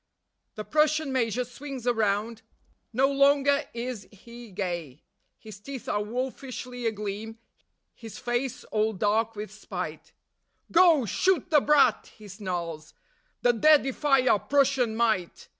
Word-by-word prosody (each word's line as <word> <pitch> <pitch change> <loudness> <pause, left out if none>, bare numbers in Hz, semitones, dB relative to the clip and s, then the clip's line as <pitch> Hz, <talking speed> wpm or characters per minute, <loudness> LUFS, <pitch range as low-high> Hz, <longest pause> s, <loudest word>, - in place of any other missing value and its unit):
The 215 - -5
Prussian 305 -2 +1
Major 245 -1 0
swings 265 0 -8
around; 220 -1 0 0.5
no 260 +4 +3
longer 280 +1 +3
is 235 -4 -5
he 235 +3 -13
gay. 175 -8 -5 0.3
His 215 -2 -12
teeth 265 +4 -8
are 205 - 0
wolfishly 250 +1 -5
agleam; 215 +1 -5 0.6
his 225 -3 -11
face 240 +1 -3
all 215 0 +1
dark 215 +3 0
with 210 -1 -6
spite: 210 - -7 0.6
"Go, 335 -7 +5
shoot 340 - +1
the 300 -2 +6
brat," 280 -5 +3
he 215 -1 -13
snarls, 175 -5 -5 0.5
"that 240 -2 +2
dare 310 0 +8
defy 270 -1 +1
our 210 - +4
Prussian 270 -4 +1
might. 220 -7 -1
235 Hz, 125 wpm, -27 LUFS, 210-270 Hz, 0.6 s, dare